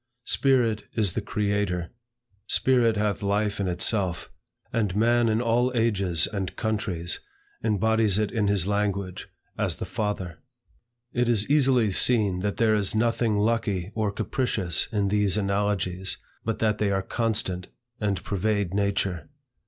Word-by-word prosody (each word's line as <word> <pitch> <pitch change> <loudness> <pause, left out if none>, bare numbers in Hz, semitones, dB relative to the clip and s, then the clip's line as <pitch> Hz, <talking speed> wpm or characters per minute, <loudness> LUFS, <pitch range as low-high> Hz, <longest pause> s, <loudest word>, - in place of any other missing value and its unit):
Spirit 120 -6 +2
is 105 -6 +1
the 110 - -2
Creator. 100 -4 -1 0.6
Spirit 120 -4 +3
hath 105 0 0
life 105 +1 0
in 100 - 0
itself. 90 0 0 0.4
And 105 -5 0
man 120 +2 +3
in 110 +2 +1
all 120 +2 +2
ages 100 -8 +1
and 95 -4 -4
countries, 105 -6 -1 0.4
embodies 110 -1 +2
it 105 -1 0
in 110 -4 0
his 100 -3 +2
language, 100 -2 -2 0.3
as - - 0
the - - -5
FATHER. 95 -6 -3 0.7
It 120 0 +1
is 110 -3 +3
easily 130 -7 +3
seen 100 -3 +3
that 100 +2 -2
there 115 -2 +3
is 105 -1 0
nothing 115 -1 +1
lucky 105 -4 0
or 110 -2 -1
capricious 100 -6 0
in 100 -3 0
these 105 -1 +2
analogies, 100 -2 -1 0.3
but 115 0 -2
that 110 -1 0
they 105 - +1
are 95 -1 0
constant, 105 -5 -2 0.3
and 100 -4 -1
pervade 100 -1 -1
nature. 100 -2 -1
105 Hz, 140 wpm, -26 LUFS, 95-110 Hz, 0.7 s, Spirit